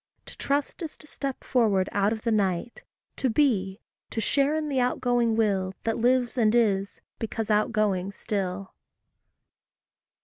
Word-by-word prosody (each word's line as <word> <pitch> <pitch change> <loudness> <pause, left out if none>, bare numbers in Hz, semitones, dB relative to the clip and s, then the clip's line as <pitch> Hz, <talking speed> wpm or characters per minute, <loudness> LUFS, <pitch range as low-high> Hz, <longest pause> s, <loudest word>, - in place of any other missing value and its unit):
To - - -12
trust 285 +5 -2
is 320 -3 -6
to - - -13
step 275 -3 -5
forward 210 -7 +2
out 200 +1 +2
of 220 -1 -4
the 230 - 0
night 200 +1 0 0.4
To 260 - +1
be 215 -7 +1 0.3
to - - -3
share 280 +6 +1
in 310 -1 -1
the 275 -3 0
outgoing 245 -2 +1
Will 195 -4 +1
That 225 0 -1
lives 245 +1 +2
and 220 0 +3
is, 200 -4 +1 0.2
because 225 -1 -3
outgoing 210 -3 +1
still. 195 -2 -4
225 Hz, 145 wpm, -26 LUFS, 200-250 Hz, 0.4 s, and